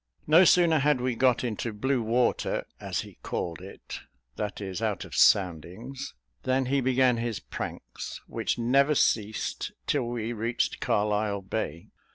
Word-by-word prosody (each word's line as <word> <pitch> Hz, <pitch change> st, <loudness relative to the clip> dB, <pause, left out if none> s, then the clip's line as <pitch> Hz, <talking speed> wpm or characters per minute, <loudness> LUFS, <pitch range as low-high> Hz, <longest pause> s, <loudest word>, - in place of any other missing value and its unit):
No 165 Hz, +5 st, +7 dB
sooner 170 Hz, -3 st, +5 dB
had 145 Hz, -1 st, +3 dB
we 125 Hz, 0 st, 0 dB
got 125 Hz, +1 st, +2 dB
into 115 Hz, -1 st, -2 dB
blue 125 Hz, +5 st, 0 dB
water, 120 Hz, +2 st, +1 dB
as -, -, -2 dB
he -, -, -13 dB
called 85 Hz, -1 st, -4 dB
it 95 Hz, +1 st, -9 dB, 0.4 s
that 105 Hz, -1 st, -4 dB
is, 95 Hz, 0 st, -5 dB
out 110 Hz, -4 st, -1 dB
of -, -, -12 dB
soundings 100 Hz, -, +1 dB, 0.3 s
than 130 Hz, 0 st, +1 dB
he 135 Hz, +2 st, +1 dB
began 130 Hz, -1 st, +3 dB
his 115 Hz, -3 st, -2 dB
pranks, -, -, -7 dB
which -, -, -2 dB
never 135 Hz, +5 st, +3 dB
ceased 110 Hz, -4 st, 0 dB
till 120 Hz, -, 0 dB
we 120 Hz, -1 st, -3 dB
reached 115 Hz, +2 st, -1 dB
Carlisle 105 Hz, -1 st, 0 dB
Bay. 95 Hz, -5 st, -4 dB
120 Hz, 150 wpm, -28 LUFS, 105-130 Hz, 0.4 s, No